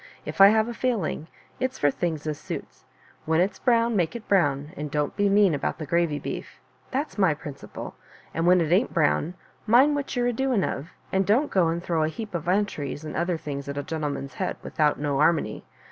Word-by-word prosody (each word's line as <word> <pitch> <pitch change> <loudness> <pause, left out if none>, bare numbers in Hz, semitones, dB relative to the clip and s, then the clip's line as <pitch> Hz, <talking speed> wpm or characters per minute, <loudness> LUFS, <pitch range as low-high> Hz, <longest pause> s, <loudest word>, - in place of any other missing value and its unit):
" - - -28
If - - -1
I 195 - +11
have 220 +2 +4
a 240 - -4
failing, 220 -11 -1 0.3
it*s 260 +1 -1
for 145 - +3
things 160 -1 -3
as 150 -1 -3
suits. - - -7 0.4
When 160 0 +3
it's 185 +3 +1
brown, 235 -2 +2
make 175 -2 0
it 235 - -7
brown, 145 -6 +2
and 150 -2 -5
don't 150 0 -1
be 205 -1 +2
mean 200 -3 +5
about 145 - -2
the 155 - -5
g^vy 165 -1 +1
beef - - -6
— - - -34
that's 275 -4 -3
my 185 -6 +4
prin 145 -1 -7
ciple; - - -9 0.4
and 165 +1 0
when 180 0 +6
it 160 -1 -1
ain't 200 +7 +2
brown, 165 +1 +2 0.3
mind 260 +7 +6
what 285 -1 -3
you're 245 -1 +1
a 245 - +1
doing 255 -4 +1
of 145 +5 -3
— - - -30
and 190 0 +3
don't 245 +9 +3
go 185 -4 +3
and 170 +1 -2
throw 165 -3 0
a 155 - +2
heap 215 +4 -7
of 170 -3 -3
entrys 175 -7 -1
and 170 +2 -2
things 140 -1 -5
at 140 - -4
a 145 - -2
gentleman's 145 -3 -4
head 185 - -3
without 150 -2 +1
no'armony. 145 -4 +1
170 Hz, 220 wpm, -25 LUFS, 150-210 Hz, 0.4 s, I